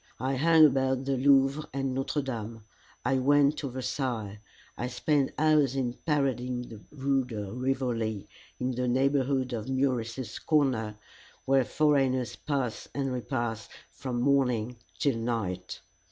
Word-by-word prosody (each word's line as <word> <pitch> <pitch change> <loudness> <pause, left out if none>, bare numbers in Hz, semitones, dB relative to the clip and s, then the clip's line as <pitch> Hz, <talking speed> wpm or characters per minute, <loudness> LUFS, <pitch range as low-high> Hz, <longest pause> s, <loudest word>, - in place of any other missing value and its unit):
I 135 +1 -1
hung 160 +3 +6
about 130 -2 +1
the 135 0 +1
Louvre 135 +2 +3
and 135 -1 -2
Notre 135 +2 -1
Dame. 115 -4 -5 0.4
I 135 -1 +2
went 145 +2 +4
to 140 - -3
Versailles. 120 -5 -3 0.4
I 125 - -3
spent 135 +3 +1
hours 150 -4 +3
in 125 -3 -1
parading 130 -4 0
the 110 -2 -10
Rue 135 -2 0
de 105 -5 -6
Rivoli, 120 -5 -1 0.3
in 125 +1 -1
the 125 0 -2
neighborhood 130 0 +1
of 115 +1 -4
Meurice's 130 -2 -1
corner, 125 -9 +1 0.5
where 135 0 +4
foreigners 135 -3 +1
pass 135 -6 -3
and 135 -2 -1
repass 120 -3 -3 0.2
from 125 -3 -4
morning 125 -4 +1 0.2
till 140 -5 +1
night. 105 -6 -3
130 Hz, 135 wpm, -28 LUFS, 120-140 Hz, 0.5 s, hung